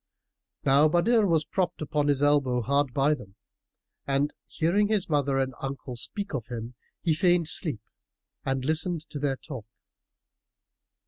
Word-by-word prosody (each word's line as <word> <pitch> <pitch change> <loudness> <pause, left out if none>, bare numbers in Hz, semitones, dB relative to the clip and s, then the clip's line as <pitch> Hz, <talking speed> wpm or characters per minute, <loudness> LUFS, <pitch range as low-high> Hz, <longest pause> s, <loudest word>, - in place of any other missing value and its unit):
Now 140 +3 +5
Badr 205 +7 +3
was 160 -3 +2
propped 180 -2 -1
upon 150 -1 0
his 145 -1 +2
elbow 140 -4 +3
hard 140 +2 +1
by 140 +4 +3
them; 105 -9 -9 0.7
and, 140 +2 +1
hearing 175 +6 +1
his 210 -3 +1
mother 140 -3 +1
and 130 -1 0
uncle 135 -2 -5
speak 200 - -5
of 125 -6 -3
him, 120 0 -6 0.3
he 165 - +3
feigned 175 0 +2
sleep 140 - 0 0.6
and 135 -1 -1
listened 160 +2 0
to 145 - -4
their 140 -1 0
talk. 130 -4 -9
145 Hz, 145 wpm, -27 LUFS, 135-165 Hz, 0.7 s, Now